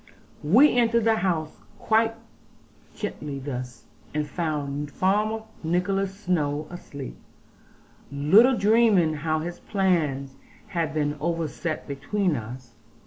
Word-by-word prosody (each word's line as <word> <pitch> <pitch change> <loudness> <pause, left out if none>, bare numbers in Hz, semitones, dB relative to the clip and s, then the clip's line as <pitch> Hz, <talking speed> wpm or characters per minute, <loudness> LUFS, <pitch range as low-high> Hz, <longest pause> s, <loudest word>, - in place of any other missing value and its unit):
We 235 - +5
entered 235 -1 +3
the 225 0 +3
house 165 -6 -1 0.2
quite 225 +1 +2 0.8
gently 150 -9 -5
thus, 130 -3 -6 0.3
and 150 -1 0
found 145 -2 -3
Farmer 210 +7 0 0.2
Nicholas 195 +4 -1
Snowe 150 -4 0
asleep, 140 - -8 0.9
little 200 - +5
dreaming 210 -6 +4
how 155 +1 -1
his 175 +2 -5
plans 155 -9 0 0.3
had 165 -3 -2
been 150 -1 0
overset 165 0 -3
between 175 +5 -1
us. 120 +1 -8
165 Hz, 105 wpm, -25 LUFS, 145-200 Hz, 0.9 s, We